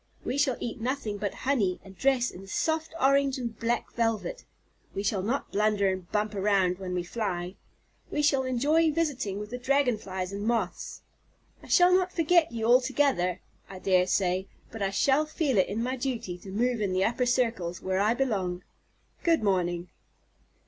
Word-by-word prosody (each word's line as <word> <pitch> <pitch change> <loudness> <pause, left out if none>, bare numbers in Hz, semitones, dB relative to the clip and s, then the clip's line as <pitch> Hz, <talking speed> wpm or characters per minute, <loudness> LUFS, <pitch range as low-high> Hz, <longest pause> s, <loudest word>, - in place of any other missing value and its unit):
We 255 - -1
shall 280 -3 +2
eat 240 0 -5
nothing 235 -4 -2
but 205 -1 -3
honey, 215 -10 +1
and 195 0 -13
dress 260 +1 +2
in 195 +2 -11
soft 320 +10 -1
orange 275 -1 +3
and 235 -3 -4
black 235 +1 -1
velvet. 230 - -1 0.5
We 200 - -2
shall 205 -2 0
not 240 +8 -2
blunder 205 -1 +2
and 185 -2 -6
bump 210 0 0
around 195 -2 +1
when 185 -1 -4
we 180 - -1
fly. 180 -2 -3 0.6
We 295 - -1
shall 280 -2 +3
enjoy 290 +6 +2
visiting 290 -11 -1
with 210 +1 -6
the 245 - -4
Dragon 255 -3 +2
flies 185 -2 -5
and 200 +1 -4
Moths. 220 -5 -2 0.6
I - - -14
shall 360 0 +5
not 365 0 +3
forget 335 -1 +3
you 225 -1 -3
altogether, 245 -7 +2 0.3
I 190 - -8
dare 185 -1 +2
say, 185 0 +1 0.2
but 225 - -8
I 195 - +1
shall 275 +9 +2
feel 290 - +1
it 185 - +2
my 250 +3 -1
duty 240 -8 -3
to 195 - -11
move 235 +3 0
in 195 -3 0
the 185 +1 +2
upper 245 +2 0
circles, 225 -9 0
where 190 0 0
I 215 +4 +3
belong. 190 -9 -1 0.6
Good 330 -7 +2
morning." 180 -3 0
225 Hz, 175 wpm, -28 LUFS, 190-265 Hz, 0.6 s, shall